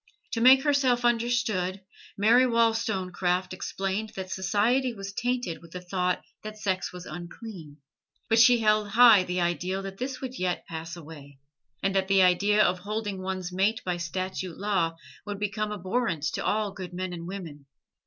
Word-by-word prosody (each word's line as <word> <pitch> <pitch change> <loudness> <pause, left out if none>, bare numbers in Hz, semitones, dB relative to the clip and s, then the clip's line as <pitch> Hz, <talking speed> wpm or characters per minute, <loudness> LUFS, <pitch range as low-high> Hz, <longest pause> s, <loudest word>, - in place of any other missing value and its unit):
To 230 - -2
make 260 +2 +7
herself 265 -5 +2
understood. 230 -6 +1 0.4
Mary 235 +5 +5
Wollstonecraft 190 -6 0
explained 195 +3 -3
that 185 -1 -6
society 225 +6 +1
was 195 -1 -7
tainted 245 -7 -2
with 170 -1 -15
the 180 - -5
thought 180 0 -1 0.2
that 215 0 -8
sex 190 -3 -2
was 180 0 -9
unclean; 175 -3 -9 0.5
but 225 0 +3
she 240 0 +6
held 215 -1 +2
high 225 -2 +7
the 180 0 -2
ideal 180 +3 -1
that 195 0 -7
this 255 +1 -4
would 260 -1 -6
yet 180 -1 -1
pass 165 +1 -6
away, 150 -4 -12 0.5
and 195 - +1
that 190 -1 +1
the 195 -1 +5
idea 200 +4 +4
of 180 0 +1
holding 205 0 -4
one's 185 -1 -4
mate 200 +4 +1
by 180 -1 -1
statute 185 0 -4
law 190 -5 0 0.3
would 205 -1 -4
become 210 +1 -2
abhorrent 190 -4 -2
to - - -3
all 210 -1 0
good 185 -2 -8
men 185 0 -4
and 170 -1 -7
women. 165 -7 -8
195 Hz, 165 wpm, -27 LUFS, 180-225 Hz, 0.5 s, make